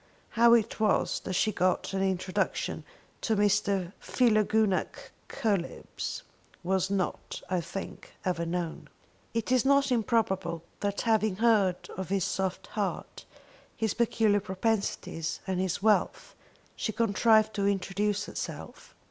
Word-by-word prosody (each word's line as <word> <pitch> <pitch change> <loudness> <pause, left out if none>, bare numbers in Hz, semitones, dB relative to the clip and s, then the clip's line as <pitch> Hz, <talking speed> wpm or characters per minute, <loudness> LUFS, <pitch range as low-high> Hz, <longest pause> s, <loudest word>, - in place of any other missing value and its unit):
How 235 0 +6
it 230 -1 0
was 215 -2 +2
that 190 - -3
she 215 +4 +2
got 185 0 0
an 190 - 0
introduction 185 -1 -1 0.4
to 220 - +1
Mr. 200 -2 +1
Philogunac 215 -4 +1 0.2
Coelebs 200 -6 -3 0.4
was 190 +1 +1
not, 195 -2 -2
I 180 -2 +1
think, 195 +4 -7
ever 175 -2 0
known. 170 -1 -4 0.5
It 230 +1 -1
is 255 -3 +4
not 280 0 +3
improbable 205 -8 0 0.2
that 200 0 -1
having 220 -3 +2
heard 205 -4 +2
of 190 -2 -4
his 195 -2 +1
soft 190 -1 -2
heart, 205 -3 -3 0.5
his 220 -3 0
peculiar 220 -3 +2
propensities, 195 -4 -2
and 190 -1 -1
his 185 +1 -1
wealth, 215 -1 +1 0.4
she 220 - -2
contrived 220 0 +3
to 200 -1 0
introduce 200 +1 0
herself. - - -7
200 Hz, 125 wpm, -29 LUFS, 185-220 Hz, 0.5 s, How